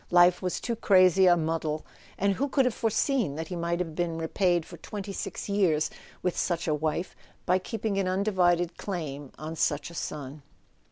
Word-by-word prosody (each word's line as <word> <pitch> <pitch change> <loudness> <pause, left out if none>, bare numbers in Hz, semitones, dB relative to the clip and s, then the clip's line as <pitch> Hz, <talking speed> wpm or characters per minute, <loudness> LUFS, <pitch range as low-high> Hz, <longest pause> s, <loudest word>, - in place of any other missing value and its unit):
Life 175 0 +5
was 180 -1 -1
too 235 - -2
crazy 185 -3 +5
a 175 -1 +6
muddle—and 160 +4 -2
who 275 +8 -1
could 270 -1 +3
have 250 - +1
foreseen 225 - 0
that 160 +1 -5
he 180 - -4
might 170 0 -1
have 165 -3 -3
been 170 0 -1
repaid 175 +1 +1
for 170 - -11
twenty 200 +4 -6
six - - -5
years 180 -7 +2 0.3
wdth 180 - +1
such 170 -2 -1
a 155 - +2
wife 155 +4 -2 0.3
by 185 +1 +3
keeping 210 0 -2
an 190 - 0
undivided 180 -3 +1
claim 145 -8 -4
bn 155 +2 -6
such 150 +1 0
a - - -11
son 145 -3 -5
175 Hz, 180 wpm, -28 LUFS, 160-195 Hz, 0.3 s, a